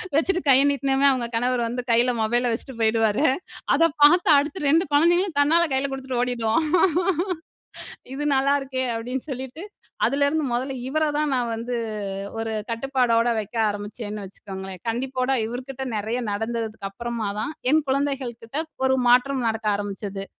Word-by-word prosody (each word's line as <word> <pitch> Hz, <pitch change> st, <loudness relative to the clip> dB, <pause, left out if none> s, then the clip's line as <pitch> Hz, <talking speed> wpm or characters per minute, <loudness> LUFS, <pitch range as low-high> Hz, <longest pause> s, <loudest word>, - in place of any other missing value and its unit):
வச்சுட்டு 360 Hz, +4 st, +2 dB
கைய 270 Hz, 0 st, +7 dB
நீட்னமே, 275 Hz, -1 st, +1 dB
அவுங்க 255 Hz, -3 st, 0 dB
கணவர் 245 Hz, +1 st, +1 dB
வந்து 245 Hz, +2 st, -3 dB
கையில 240 Hz, +2 st, +4 dB
மொபைல 240 Hz, +3 st, +1 dB
வச்சுட்டு 255 Hz, +4 st, -5 dB
போயிடுவாரு. 225 Hz, +4 st, +2 dB, 0.5 s
அதை 330 Hz, +4 st, +5 dB, 0.2 s
பாத்து 335 Hz, +5 st, +6 dB
அடுத்து 295 Hz, +6 st, -1 dB
2 325 Hz, +4 st, +4 dB
குழந்தைங்களும் 345 Hz, +2 st, +3 dB
தன்னால 320 Hz, +4 st, +5 dB
கைல 265 Hz, +1 st, +1 dB
குடுத்துட்டு 265 Hz, -2 st, -3 dB
ஓடிடுவோம். 245 Hz, +4 st, 0 dB, 1.5 s
"இது 285 Hz, +2 st, -4 dB
நல்லாருக்கே" 270 Hz, -1 st, +1 dB
அப்பிடின்னு 250 Hz, +5 st, -4 dB
சொல்லிட்டு, 265 Hz, +6 st, -6 dB, 0.4 s
அதுலேருந்து 285 Hz, +2 st, +1 dB
மொதல்ல 260 Hz, +3 st, -2 dB
இவர 310 Hz, +3 st, +1 dB
தான் 300 Hz, -1 st, 0 dB
நான் 240 Hz, -2 st, -1 dB
வந்து 240 Hz, +2 st, -4 dB, 0.6 s
ஒரு 225 Hz, 0 st, -3 dB, 0.2 s
கட்டுப்பாடோட 240 Hz, -1 st, +1 dB
வைக்க 215 Hz, +2 st, -6 dB
ஆரம்பிச்சேன்னு 205 Hz, 0 st, -6 dB
வச்சுக்கோங்களேன்! 190 Hz, -1 st, -9 dB
கண்டிப்போட 255 Hz, +2 st, -1 dB
இவருகிட்ட 260 Hz, +3 st, -6 dB
நிறைய 220 Hz, +4 st, -2 dB
நடந்ததுக்கு 225 Hz, -1 st, -3 dB
அப்பறமா 235 Hz, 0 st, -4 dB
தான், 230 Hz, +8 st, -3 dB, 0.2 s
என் 310 Hz, 0 st, +4 dB
குழந்தைகள்கிட்ட 265 Hz, -3 st, -2 dB, 0.3 s
ஒரு 265 Hz, 0 st, +3 dB
மாற்றம் 250 Hz, +1 st, +3 dB
நடக்க 220 Hz, -1 st, -2 dB
ஆரம்பிச்சது. 200 Hz, -1 st, -5 dB
250 Hz, 135 wpm, -24 LUFS, 225-275 Hz, 1.5 s, கைய